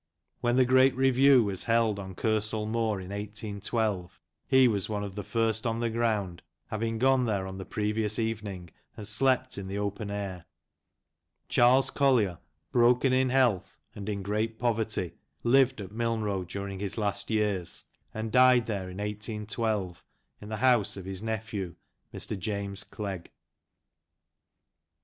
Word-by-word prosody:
When 120 0 +1
the 130 0 +5
great 130 +1 +5
review 135 0 +5
was 100 -3 -3
held 115 -3 +2
on 95 -2 -7
Kersal 110 0 0
Moor, 110 -2 0
in 95 +1 -8
18 105 0 -5
12, 105 -5 -1 0.3
he 130 -1 +6
was 100 -4 -1
one 105 -1 -2
of 100 -2 -5
the 105 - -4
first 115 +1 0
on 115 0 -1
the 115 -1 0
ground, 105 -6 -1 0.3
having 115 +1 -2
gone 130 +1 +3
there 100 -3 0
on 95 0 -7
the 95 - -6
previous 105 0 -1
evening 105 -6 -3 0.3
and 105 - -5
slept 130 +1 +2
in 95 - -6
the 100 +1 -4
open 100 +1 -3
air. 100 -4 -5 1.0
Charles 125 +2 +5
Collier, 120 - +2 0.3
broken 125 +2 +4
in 130 0 +3
health, 125 -8 +2 0.2
and 100 +1 -6
in 100 -2 -3
great 110 +3 -1
poverty, 110 -6 -1 0.3
lived 130 +1 +4
at 95 -2 -7
Milnrow 110 -4 -1
during 100 +1 -5
his 100 +1 -4
last 105 -4 -1
years, 105 -5 0 0.3
and 110 0 -4
died 125 -1 +6
there 100 -4 -3
in 90 - -9
181 105 0 -2
2, 90 - -15 0.5
in 105 - -9
the 110 - -3
house 120 -4 +3
of 95 - -7
his 95 0 -4
nephew, 110 -5 -4 0.4
Mr. - - -4
James 100 0 -3
Clegg. 95 -5 -6
110 Hz, 155 wpm, -29 LUFS, 100-120 Hz, 1.0 s, he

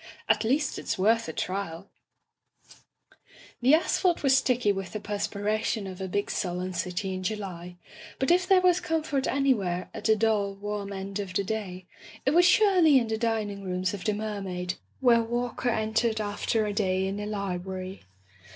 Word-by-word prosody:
"At 220 0 +3
least 270 +5 0
it's - - -3
worth 225 +2 +2
a - - -2
trial/' 185 0 -4 1.8
The 260 +5 +6
asphalt 345 +1 +1
was 270 -1 +5
sticky 250 -5 +2
with 195 -2 -5
the 215 - -3
perspira 210 +1 -2
tion 215 -4 -1
of 190 0 -7
a 190 - -3
big 205 +2 -2
sullen 180 0 -2
city 180 +2 -2
in 185 - -4
July, 185 -3 -5 0.4
but 265 - +1
if 365 +1 +3
there 380 -1 +5
was 365 -1 +4
comfort 315 -5 -1
anywhere 205 -11 0
at - - -8
the 220 0 +5
dull, 210 -2 +1
warm 205 0 -4
end 195 +1 -5
of 190 -3 -5
the 200 - +2
day, 190 -3 -4 0.4
it 270 - +3
was 350 +3 +5
surely 360 -6 +5
in 235 -3 +1
the 220 - 0
dining 215 -3 -1
rooms 185 +1 -1
of 200 - -6
the 215 - 0
Mermaid, 195 -4 -3 0.3
where 240 -3 +5
Walker 240 +2 -2
entered 220 0 0
after 215 +1 -1
a 205 - -2
day 190 -2 +1
in 195 +1 -3
a 210 - -4
library. 190 -2 -4
210 Hz, 175 wpm, -27 LUFS, 190-240 Hz, 1.8 s, The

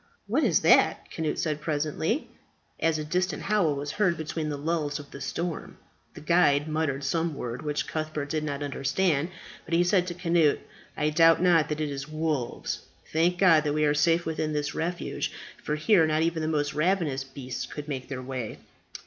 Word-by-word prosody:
"What - - +1
is - - +3
that?" - - +4
Cnut 160 -2 -2
said 150 -2 -1
presently, 155 - -1 0.5
as 165 -1 +2
a 155 - -3
distant 180 +4 -1
howl 195 -8 +2
was 145 +1 -4
heard 185 -5 +1
between 155 0 -3
the 145 - -3
lulls 150 -1 -1
of 145 -2 -11
the 140 - -9
storm. 165 +4 -4 0.4
The - - -9
guide 150 -3 +3
muttered 155 -3 -1
some 165 +2 0
word, 120 -2 -5
which 150 -1 -2
Cuthbert 155 -2 -3
did 155 +1 -2
not 145 -1 -3
understand. 145 +3 0 0.3
But 165 - -2
he 175 - +4
said 180 0 +2
to 175 - -4
Cnut, 170 -4 +3 0.4
"I 150 0 +1
doubt 165 +1 +6
not 170 -4 +4
that 150 0 -2
it 150 -2 -1
is 135 0 -5
wolves. 155 -5 -2 0.3
Thank 170 +3 +2
God 165 -5 +5
that 145 -1 0
we 150 0 +2
are 145 - +3
safe 165 +3 +2
within 155 -1 -2
this 145 -1 -1
refuge, 175 +2 -3 0.3
for 150 - -1
here 160 +2 +4
not 155 +1 +2
even 165 -1 0
the 155 - -1
most 150 -2 0
ravenous 155 -4 +1
beasts 130 -2 -6
could 150 0 -7
make 130 -3 -4
their 130 -2 -5
way." 125 -3 -5
155 Hz, 190 wpm, -27 LUFS, 145-165 Hz, 0.5 s, doubt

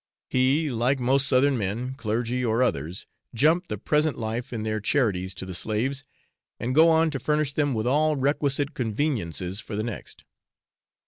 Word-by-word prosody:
He, 135 +4 +2
like 125 +3 +1
most 135 +3 +2
Southern 130 0 +3
men, 110 +6 -2
clergy 120 0 -2
or 115 +1 +2
others, 85 - -2 0.3
jump 160 +8 +3
the - - -4
present 150 0 +1
life 115 +1 -4
in 115 -3 -3
their 110 0 -1
charities 100 -6 0
to 95 - -6
the 95 - -6
slaves, 120 +9 -2 0.5
and 125 +2 -2
go 160 +4 +6
on 160 0 +3
to 135 - -3
furnish 150 +1 0
them 145 -4 +1
with 110 0 -1
all 150 +4 +2
requisite 140 +1 0
conveniences 105 - -2
for 110 - -5
the 105 - -1
next. 115 -2 -7
125 Hz, 170 wpm, -25 LUFS, 110-145 Hz, 0.5 s, go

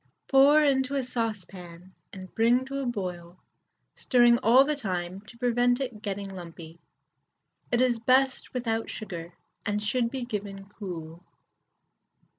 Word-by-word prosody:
Pour 280 +3 +6
into 275 -1 +1
a 270 - 0
saucepan 185 -7 -6 0.2
and 185 -1 -10
bring 240 +3 +3
to 270 - -9
the 275 -2 -2
boil, 180 -6 -5 0.6
stirring 240 -2 +4
all 255 +2 +6
the 300 +2 -1
time 185 -6 -4
to 235 - -14
prevent 245 +1 +2
it 245 -6 -5
getting 200 -2 -4
lumpy. 170 -3 -10 0.9
It 240 0 +2
is 245 -2 +2
best 260 +3 +2
without 225 -3 -2
sugar, 170 -5 -7 0.3
and 205 0 -2
should 235 +2 0
be 255 -1 -4
given 200 -4 -5
cool. 175 -5 -8
225 Hz, 135 wpm, -27 LUFS, 185-255 Hz, 0.9 s, Pour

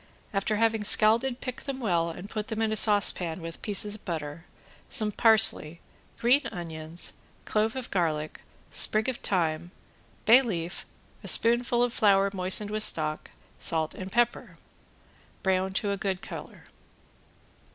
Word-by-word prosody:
After 195 +2 -1
having 225 0 0
scalded 230 +5 +4
pick 255 -2 -6
them 275 -2 -5
well 170 -8 0
and 180 +4 -9
put 215 0 -6
in 220 0 -1
a - - -1
saucepan 195 -5 +2
with 165 -1 -8
a - - -28
piece 205 -1 +1
of 210 0 -7
butter, 160 -2 -6 0.4
some 215 -1 +1
parsley, 215 -8 +4 0.4
green 250 +5 +3
onions, 165 -1 -5 0.3
clove 220 +2 -1
of 260 -2 -6
garlic, 155 -4 -2 0.3
sprig 215 0 +2
of 260 -2 -2
thyme, 170 -3 -1 0.6
bay 240 +4 +7
leaf, 175 -8 -5 0.4
a - - -8
spoonful 240 +1 +2
of 245 -1 -1
flour 200 -4 +3
moistened 190 +2 +2
with 215 0 -2
stock, 155 -6 +1 0.3
salt 160 -1 -1
and 190 0 -8
pepper. 240 +1 -1 0.9
Brown 190 0 0
to 200 +1 -2
a 200 - -2
good 195 -2 -3
color. - - -9
205 Hz, 145 wpm, -27 LUFS, 170-225 Hz, 0.9 s, bay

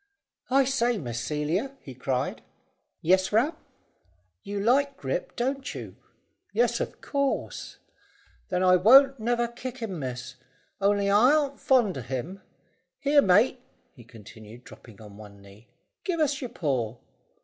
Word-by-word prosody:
"I 270 +1 +4
say, 245 -3 +1
Miss 120 - -4
Celia," 160 - -2
he 135 - -11
cried. 130 0 -2 0.6
"Yes, 185 +3 +3
Ram." 250 +10 +2 0.9
"You 200 0 -5
like 275 +6 +2
Grip, - - -4
don't 270 +3 -3
you?" - - -8 0.6
"Yes, 475 - +2
of - - -5
course." 280 -1 -3 0.7
"Then 180 0 0
I 185 0 +6
won't 270 +7 +6
never 240 +1 0
kick 245 +2 -8
him, 210 -8 -5
miss. 125 -1 -6 0.4
Only 200 0 +2
I 235 +8 +5
arn't 285 -3 -1
fond 230 - +2
on 120 - -8
him. 145 +10 -5 0.6
Here, 285 -1 +4
mate," 215 +5 +3 0.3
he 120 - -15
continued, 110 +1 -14
dropping 115 -4 -15
on 105 -2 -13
one 105 -2 -13
knee, 100 +3 -17 0.4
"give 355 -4 -2
us 290 -3 +1
your 250 - -4
paw." 125 - -2
200 Hz, 140 wpm, -26 LUFS, -, 0.9 s, I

